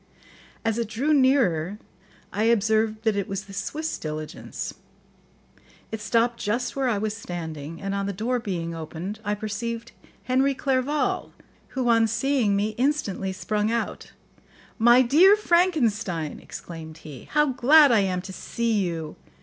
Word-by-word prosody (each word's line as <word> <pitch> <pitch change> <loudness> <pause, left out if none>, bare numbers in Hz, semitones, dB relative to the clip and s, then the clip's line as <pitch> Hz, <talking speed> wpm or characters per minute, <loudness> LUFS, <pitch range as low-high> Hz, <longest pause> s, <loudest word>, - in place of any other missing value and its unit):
As 225 0 +1
it 230 - -1
drew 260 +8 0
nearer 210 - +3 0.6
I 215 - +1
observed 220 -1 +2
that 220 -2 +2
it 200 -2 -1
was 195 +1 -4
the 195 - -12
Swiss 305 +11 -3
diligence; 155 0 -5 1.2
it 220 -1 -4
stopped 235 +2 +1
just 235 +4 -1
where 270 -2 +1
I 220 - +1
was 215 +1 -2
standing, 165 -6 -6
and 195 0 -3
on 200 0 -1
the - - -1
door 230 +6 -1
being 175 -7 -3
opened, 165 +6 -6
I 205 -1 -1
perceived 230 +3 -4 0.3
Henry 265 +2 +2
Clerval, 270 +2 0 0.4
who, 255 -2 +1
on 230 -1 +4
seeing 230 -2 +1
me, 205 +2 +1
instantly 245 -9 0
sprung 210 +2 -1
out. 235 0 -3 0.7
"My 240 +3 +7
dear 335 +11 +6
Frankenstein," 235 - +1
exclaimed 160 -2 -9
he, 145 -5 -9
"how 300 -2 +3
glad 280 +3 +6
I 230 - +5
am 185 -2 0
to 190 0 -8
see 230 +1 -1
you! 165 -3 -4
220 Hz, 150 wpm, -25 LUFS, 195-255 Hz, 1.2 s, My